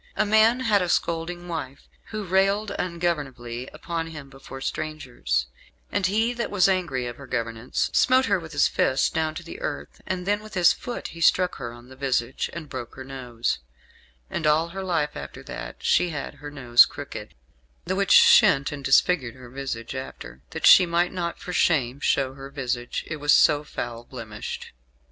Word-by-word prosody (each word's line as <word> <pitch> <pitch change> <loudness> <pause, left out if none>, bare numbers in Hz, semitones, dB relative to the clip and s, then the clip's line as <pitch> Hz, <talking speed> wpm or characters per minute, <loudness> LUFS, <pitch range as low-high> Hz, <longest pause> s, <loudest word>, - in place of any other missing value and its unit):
A - - +2
man 220 +4 +4
had 215 -5 +3
a 180 - -1
scolding 170 +2 -1
wife, 140 -5 -6 0.2
who 215 -1 -5
railed 195 +3 +2
ungovernably 145 -9 -3
upon 165 -1 -4
him 150 -4 -10
before 135 0 -10
strangers, 125 - -2 0.5
"and 200 -2 +1
he 220 +5 +1
that 235 -1 -3
was 195 -2 +4
angry 175 -10 0
of 120 0 -6
her 140 - -11
governance 115 -1 -2
smote 260 +1 +4
her 200 -4 +2
with 160 -2 -10
his 145 -2 +3
first 130 - +1
down 160 -1 -1
to 170 - -6
the 165 - -9
earth; - - -5
and 185 -1 -3
then 205 +1 +1
with 215 -2 -11
his 175 -2 +5
foot 245 -1 -6
he 165 - -10
struck 180 +2 +3
her 120 -3 -5
on 120 +1 -13
the 130 - -12
visage, 130 -2 -1
and 165 -2 -7
broke 120 -4 -7
her 130 - -8
nose; 125 -3 -3 0.7
and 155 - -2
all 160 +3 +3
her 190 +2 -6
life 165 -5 -1
after 70 -1 -8
that - - -7
she 175 - +3
had 145 -3 -5
her 145 - -6
nose 125 -4 +5
crooked, - - -8 0.5
the 185 - -1
which 200 0 0
shent 470 - +6
and 145 -2 -7
disfigured 135 -2 +3
her 125 -2 -13
visage 130 -4 -5
after, 130 - -8
that - - -3
she 185 - +9
might 170 +2 +1
not 170 -2 -3
for 180 - -7
shame 135 -7 +2
show 135 -2 +1
her 135 0 -9
visage, 125 -3 -3
it 155 - -5
was 145 0 +1
so 150 0 +5
foul 120 -5 -6
blemished. 115 -4 -7
150 Hz, 185 wpm, -25 LUFS, 130-180 Hz, 0.7 s, she